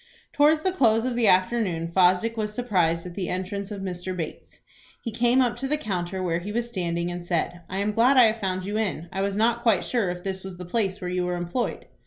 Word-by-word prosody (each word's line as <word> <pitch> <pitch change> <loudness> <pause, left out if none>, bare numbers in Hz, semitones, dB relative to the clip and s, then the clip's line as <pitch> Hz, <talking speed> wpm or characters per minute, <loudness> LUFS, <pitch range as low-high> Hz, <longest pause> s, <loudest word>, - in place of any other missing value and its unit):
Towards 305 +2 +4
the 375 - +2
close 225 -9 +3
of 255 -2 -1
the 235 -2 +2
afternoon, 185 -4 +2
Fosdick 185 +5 +3
was 215 -2 -2
surprised 180 -8 0
at 180 - -7
the 185 -1 -3
entrance 195 +2 -3
of 205 -2 -6
Mr. 185 0 -4
Bates. 165 -3 -7 0.4
He 230 - -5
came 240 +3 +3
up 240 -2 -1
to 270 +2 -3
the 300 +2 +1
counter 185 -6 -3
where 170 -2 0
he 195 +4 -6
was 235 +2 -1
standing, 175 -5 -2
and 175 0 -5
said, 175 0 -2
"I 190 - -4
am 200 +2 0
glad 240 +5 +4
I 250 - +9
have 225 0 +3
found 185 -2 -2
you 205 +2 -2
in. 180 -6 -2
I 190 - -2
was 200 0 -1
not 235 +2 +2
quite 225 -6 +3
sure 230 -7 0
if 175 0 -5
this 190 -1 -4
was 190 -2 -8
the 180 - -7
place 195 0 -1
where 180 - -3
you 180 0 0
were 180 0 -1
employed." 175 +8 -3
195 Hz, 245 wpm, -25 LUFS, 180-230 Hz, 0.4 s, I